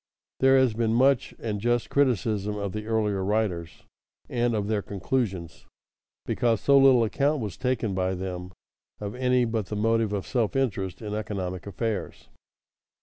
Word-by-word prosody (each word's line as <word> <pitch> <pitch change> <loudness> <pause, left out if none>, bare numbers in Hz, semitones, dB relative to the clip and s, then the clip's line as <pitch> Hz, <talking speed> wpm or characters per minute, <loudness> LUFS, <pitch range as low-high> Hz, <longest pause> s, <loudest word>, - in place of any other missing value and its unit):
_ - - -68 0.4
There 135 0 +5
has 130 -4 +3
been 115 0 0
much 135 +1 +3
and 105 -3 -4
just 120 +1 0
criticism 110 -6 +1
of 100 -2 -3
the 105 +1 -5
earlier 105 -4 0
writers 95 -6 -2 0.5
and 120 -1 0
of 105 -2 -1
their 105 -1 0
conclusions 95 -4 -3 0.6
because 115 -3 +1
so 140 - +4
little 130 -3 +6
account 140 +7 +1
was 105 -5 -4
taken 125 -5 -1
by 95 0 0
them 90 0 -5 0.5
of 105 -1 -5
any 125 -1 +2
but 110 -3 -2
the 105 - -4
motive 115 0 +1
of 100 -2 -2
self 120 0 -1
interest 100 -7 -1
in 105 -1 -4
economic 95 -3 -4
affairs. 110 +2 -4
110 Hz, 160 wpm, -26 LUFS, 100-120 Hz, 0.6 s, little